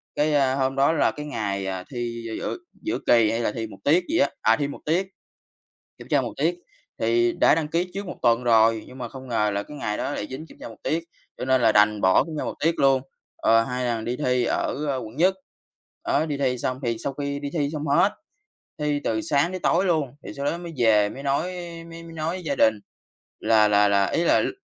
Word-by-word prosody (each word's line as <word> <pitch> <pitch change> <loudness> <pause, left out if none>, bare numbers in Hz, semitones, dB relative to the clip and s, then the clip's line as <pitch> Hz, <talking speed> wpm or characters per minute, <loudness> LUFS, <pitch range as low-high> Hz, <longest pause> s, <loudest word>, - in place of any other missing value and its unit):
cái, 150 +1 +1
a, 135 -2 +3
hôm 135 -1 0
đó 140 +4 +3
là - - +2
cái 150 - -7
ngày, 100 -8 -3
à, 95 -1 -4
thi 120 -2 -4
gi 110 - -4
giữa - - -3 0.2
giữa 335 +2 -2
kỳ 115 -3 +5
hay 115 - -1
là 110 - 0
thi 115 0 -4
1 - - -12
tiết 170 +5 +4
gì - - +1
á, 140 - +3
à, 110 +1 +4
thi 140 - 0
1 140 - -8
tiết, 180 +5 +1 0.9
kiểm - - -12
tra - - +3
1 - - -4
tiết 165 +5 +1 0.5
thì 120 +1 +2
đã - - +4
đăng 155 -2 -2
ký 175 +3 -1
trước 200 0 -4
1 - - -6
tuần 120 +1 +3
rồi, 115 -1 +4
nhưng 130 +1 -12
mà 120 - -5
không 130 +1 -10
ngờ 105 -3 +1
là 100 - -1
cái 150 +7 -11
ngày 105 -6 -2
đó - - -2
lại 105 - -4
dính 140 +5 -7
kiểm - - -17
tra - - -8
1 110 - -12
tiết, 165 +1 -1 0.3
cho - - -3
nên 130 0 +3
là 115 -2 +4
đành 105 0 +4
bỏ 95 -1 +4
kiểm 160 - -8
tra - - -2
1 - - -4
tiết 165 +1 +2
luôn. 135 -1 +4 0.3
Ờ 115 0 +4
hai 125 +1 -3
thằng 115 -2 -1
đi 120 +1 -2
thi 125 -3 +1
ở, 145 +4 -1
ờ, 135 - 0
quận 110 0 -8
Nhất. 185 +4 +4 0.7
Đó 160 - +2
đi 145 - -2
thi 130 -2 0
xong 130 +2 -2
thì 115 -1 -1
sau 140 - -3
khi 140 0 -4
đi 145 - -4
thi 145 -3 +1
xong 155 -1 -4
hết, 195 +8 +4 0.7
thi 150 -1 0
từ 110 -1 0
sáng 155 +1 +1
tới 185 - -4
tối 180 +3 +2
luôn 155 -7 +1 0.2
thì - - -6
sau 140 - -4
đó 170 - -1
mới 170 -1 -8
về 110 -3 +4
mới 135 - -8
nói 140 +1 +1 0.5
mới 165 0 -9
mới 165 0 -11
nói 160 0 -3
với 185 - -8
gia 140 -2 -1
đình 110 -3 +4 0.7
là 110 -2 +4
là 105 0 +4
là 100 -1 +3
ý 170 - 0
là, - - +4
lúc - - -2
130 Hz, 255 wpm, -24 LUFS, 115-155 Hz, 0.9 s, kỳ